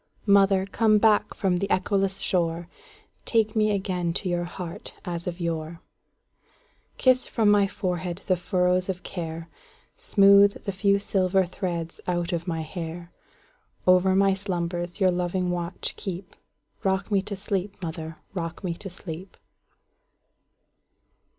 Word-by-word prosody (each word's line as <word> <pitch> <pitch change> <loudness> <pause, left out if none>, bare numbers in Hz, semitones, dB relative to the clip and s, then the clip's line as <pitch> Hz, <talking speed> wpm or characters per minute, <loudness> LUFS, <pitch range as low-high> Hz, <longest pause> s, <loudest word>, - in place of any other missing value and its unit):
Mother, 195 -2 +5
come 215 +2 +3
back 210 -1 +3
from 185 -2 +1
the 200 - -2
echoless 195 0 +1
shore, 170 -1 0 0.6
Take 220 -2 +1
me 215 -1 +3
again 185 -4 -1
to 185 - -3
your 175 -1 0
heart 175 -1 -7
as 170 -1 -4
of 175 0 -4
yore; 165 -1 -3 1.2
Kiss 255 -1 +3
from 215 -3 +3
my 205 -1 +4
forehead 180 -1 -3
the 185 - +3
furrows 180 +1 +1
of 180 -1 -3
care, 165 -2 -5 0.5
Smooth 200 0 +5
the 200 - -2
few 200 +1 +2
silver 190 -1 +1
threads 175 -2 -4
out 175 0 -1
of 170 +1 -3
my 165 -2 -1
hair; 170 +1 -6 0.7
Over 185 +1 +5
my 195 0 +4
slumbers 175 -2 -3
your 190 -2 +4
loving 180 0 -1
watch 175 +1 -3
keep;—Rock 190 +1 -5
me 200 -2 +3
to 200 +1 -5
sleep, 195 0 -3
mother,—rock 165 +2 -6
me 180 -2 -1
to 195 +3 -7
sleep! 180 0 -9
185 Hz, 130 wpm, -26 LUFS, 175-195 Hz, 1.2 s, Mother